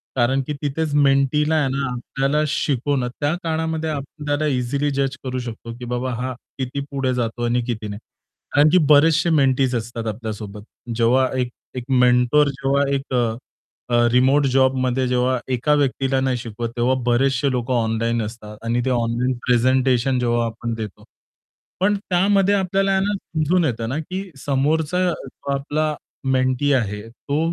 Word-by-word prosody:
कारण 130 +2 +2
की 150 - -2
तिथेच 150 +1 -2
मेंटीला 145 +2 +3
आहे 150 -3 +2
ना 135 +1 -1
आपल्याला 135 +4 -1
शिकवणं 140 -3 0
त्या 145 +1 +1
काळामध्ये 160 -1 -1
आपल्याला 145 +1 -3
इझिली 140 +2 0
जज 135 0 -1
करू 130 -1 -3
शकतो, 115 -1 -7
की 125 - -7
बाबा 125 +1 -2
हा 130 +2 -3 0.2
किती 130 +1 -3
पुढे 135 -2 0
जातो 120 -1 -2
आणि 120 +1 +1
किती 110 -3 -3
नाही. 100 0 -6 0.5
कारण 145 +2 +5
की 185 - +5
बरेचशे 160 +3 +5
मेंटीज. 135 -4 +2
असतात 115 0 -4
आपल्यासोबत 105 -2 -6 0.3
जेव्हा 120 +3 +3
एक 125 -1 0 0.3
एक 125 - -4
मेंटर. 125 +3 +4
जेव्हा 135 +1 0
एक 135 -1 -5 0.8
अ, 120 0 +4
रिमोट 135 +3 +4
जॉबमध्ये 130 -1 +2
जेव्हा 125 +1 +1 0.2
एका 130 +5 +2
व्यक्तीला 135 -1 +1
नाही 130 -1 0
शिकवत 115 0 -5
तेव्हा 120 +2 +2
बरेचसे 130 +2 +2
लोकं 125 0 -1
ऑनलाईन 115 0 0
असतात 105 -1 -8
आणि 120 +1 +1
ते - - +1
ऑनलाईन 120 +1 0
प्रेझेंटेशन 130 +1 +2
जेव्हा 120 -1 +1
आपण 115 +1 -4
देतो. 110 -3 -7 0.8
पण 205 +3 +3
त्यामध्ये 195 +2 +3
आपल्याला 195 0 +1
ना 205 +2 0
समजून 170 -1 0
येतं 115 -4 -2
ना, 135 - -2
की 185 +5 -5 0.2
समोरचा 150 +5 +1
जो 140 -2 -7
आपला 150 +2 -1 0.4
मेंटी 130 +2 +1
आहे 105 -5 0
तो 140 +5 -3
130 Hz, 155 wpm, -21 LUFS, 120-145 Hz, 0.8 s, कारण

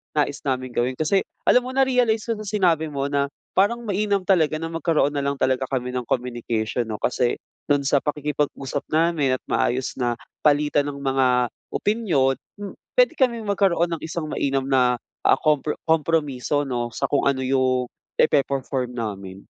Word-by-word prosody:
nais 145 -1 0
naming 130 -1 -1
gawin. 125 +2 0
Kasi 155 +8 +2 0.2
alam - - +5
mo, 260 - -6
na-realize 250 -5 +2
ko 220 - -2
sa 215 - -7
sinabi 175 -6 +2
mo 140 -1 -3
na 140 0 +1 0.2
parang 230 +5 +2
mainam 205 -2 0
talaga 165 -5 +3
na 165 +1 -4
magkaroon 165 -3 +1
na 145 - -2
lang 140 0 -1
talaga 130 -1 0
kami 125 -1 -2
ng 125 -2 -4
communication, 120 -2 -2
'no, 110 - -3
kasi 120 0 +1 0.3
do'n 145 -1 +2
sa 140 0 +3
pakikipag-usap 145 -2 -2
namin 155 -4 +2
at - - -9
maayos 130 +1 0
na 120 -1 0 0.2
palitan 145 -1 +2
ng 140 -1 -6
mga 135 -1 +2 0.5
opinyon, 175 - +1 0.3
hmm, 200 - -6 0.2
puwede - - +4
kaming 235 -4 +2
magkaroon 195 -4 +1
ng 165 - -2
isang 160 -2 -4
mainam 135 -1 0
na, 130 -2 +3 0.3
ah, - - +6
kompro 150 -1 +1
kompromiso 150 -3 +1
'no, 120 -3 -2
sa - - -2
kung 140 - +2
ano 135 -1 +1
'yung 130 -1 +1 0.2
ipe-perform 135 -3 +1
namin. 100 -4 -5
145 Hz, 165 wpm, -23 LUFS, 130-165 Hz, 0.5 s, ah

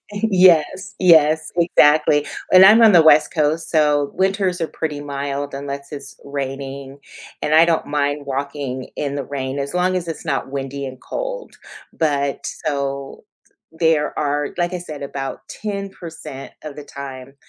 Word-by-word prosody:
Yes, 190 -1 +3
yes, 160 -3 +4
exactly, 150 -3 +4 0.3
and 185 +1 +9
I'm 215 +4 +8
on 220 -2 +7
the 170 -2 +7
west 155 -1 +5
coast, 155 +1 0
so 150 -3 +2
winters 190 -2 0
are 165 - -1
pretty 150 -3 -4
mild 140 0 -4
unless 140 0 -6
it's 145 - -9
raining, 135 0 -6 0.4
and 155 - +1
I 160 +1 +7
don't 165 -1 0
mind 145 0 -1
walking 135 -1 -4
in 140 -1 -3
the 140 - -3
rain 135 -1 -4
as 140 +4 -4
long 185 +1 +1
as 175 -2 -3
it's 165 - -6
not 135 -3 -2
windy 140 0 -4
and 130 -1 -9
cold - - -6 0.4
but 140 -3 -1 0.2
So 140 -2 -3 0.5
there 160 -2 +1
are, 145 -1 -1
like 175 +1 0
I - - -2
said, 155 -5 -8
about 135 -1 -5
10% 195 -9 -7
of 150 -2 -8
the 150 - -8
time, 135 -1 -9
145 Hz, 155 wpm, -20 LUFS, 140-170 Hz, 0.5 s, and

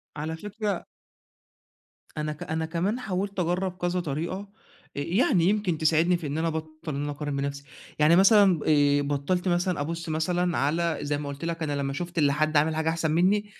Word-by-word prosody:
على 155 +2 -4
فكرة 210 +2 -4 1.3
أنا 150 0 -2
ك 150 - -8
أنا 160 0 -2
كمان 180 +8 -1
حاولت 195 -3 -3
أجرب 180 +1 -1
كذا 175 +1 0
طريقة 175 +5 -3 0.5
ي 140 - -2 0.2
يعني 180 -8 +3
يمكن 205 -5 0
تساعدني 160 +3 +3
في 165 -3 -6
إن 145 +2 -3
أنا 165 +1 0
أبطل 155 -1 -5
إن 140 - -2
أنا 145 - -2
أقارن 145 0 -4
بنفسي، 140 0 -3 0.4
يعني 155 +3 +6
مثلًا 195 -2 +6
آآ 145 -1 +4
بطلت 145 +6 -1
مثلًا 175 -2 +1
أبُص 165 +2 -4
مثلًا 175 +2 0
على 165 +4 +1
زي 145 0 -1
ما 145 -1 -5
قُلت 140 +3 -6
لك 165 -1 -3
أنا 145 -2 -1
لمّا 135 0 -2
شُفت 175 +4 -5
اللي 145 -3 +3
حد 155 +1 +1
عامل 155 +2 +2
حاجة 160 0 0
أحسن 160 -1 0
مني 190 +6 +3
160 Hz, 190 wpm, -26 LUFS, 150-180 Hz, 1.3 s, يعني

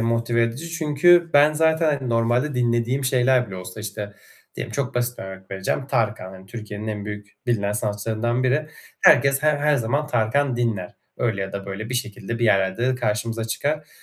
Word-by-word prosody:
motive 115 +1 +1
edici 125 +9 -2
çünkü 170 +2 +4
ben 145 +1 +6
zaten, 160 +1 +2
hani, 130 - -5
normalde 120 +5 +1
dinlediğim 120 +2 +1
şeyler 125 -1 +3
bile 95 -3 -8
olsa, 90 +3 -8
işte, 105 -1 -6 0.4
diyelim - - -5
çok 140 -1 -2
basit 120 0 -1
bir - - -5
örnek 95 0 -10
vereceğim, 95 +7 -2
Tarkan, 110 -7 -1
hani, 95 0 -13
Türkiye'nin 105 0 -7
en 105 -1 -4
büyük, 105 0 -7
bilinen 105 -4 +1
sanatçılarından 110 +3 -1
biri. 140 +4 +1 0.3
Herkes 140 +1 +5
her 155 -1 +3
her 150 0 +2
zaman 140 +5 0
Tarkan 125 +1 +1
dinler. 110 -7 -2 0.2
Öyle 110 -4 -1
ya 95 0 -4
da 100 0 -5
böyle 100 +3 -5
bir 125 - -4
şekilde 115 -2 -4
bir 120 - +1
yerlerde 100 +2 +2
de 130 - +1
karşımıza 115 -1 -2
çıkar 150 +7 -2
120 Hz, 185 wpm, -23 LUFS, 105-135 Hz, 0.4 s, ben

